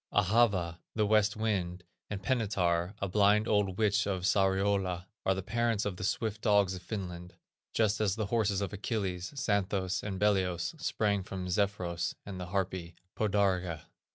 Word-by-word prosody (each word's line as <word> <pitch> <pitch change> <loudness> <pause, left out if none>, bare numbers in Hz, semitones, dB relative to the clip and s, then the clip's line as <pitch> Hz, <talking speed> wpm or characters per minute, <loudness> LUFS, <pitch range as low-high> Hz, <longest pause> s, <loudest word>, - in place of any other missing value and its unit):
Ahava, 100 -5 +2 0.2
the 110 -1 +2
West 105 0 +3
wind, 95 -5 -1 0.3
and 100 -2 -5
Penitar, 95 -7 +1
a 100 - -2
blind 105 +3 +4
old 100 -3 +1
witch 105 -2 +2
of 95 -3 -2
Sariola, 95 -1 +1 0.2
are 95 - +4
the 95 - -4
parents 115 0 0
of 100 -3 -3
the - - -6
swift 110 +2 -1
dogs 100 -4 +3
of 90 - -6
Finland, 90 -3 -6 0.4
just 110 -1 +1
as 100 -3 +2
the 110 -2 -1
horses 105 -4 +2
of 100 - -3
Achilles, 95 -4 -2
Xanthos 100 -6 0
and 95 -2 -4
Belios, 95 - +1
sprang 105 -8 +1
from 95 -1 -5
Zephyros 90 -3 -1
and 95 -2 -6
the 90 - -5
harpy 90 -2 -2 0.2
Podarge. 95 -5 +1
100 Hz, 155 wpm, -31 LUFS, 90-105 Hz, 0.4 s, blind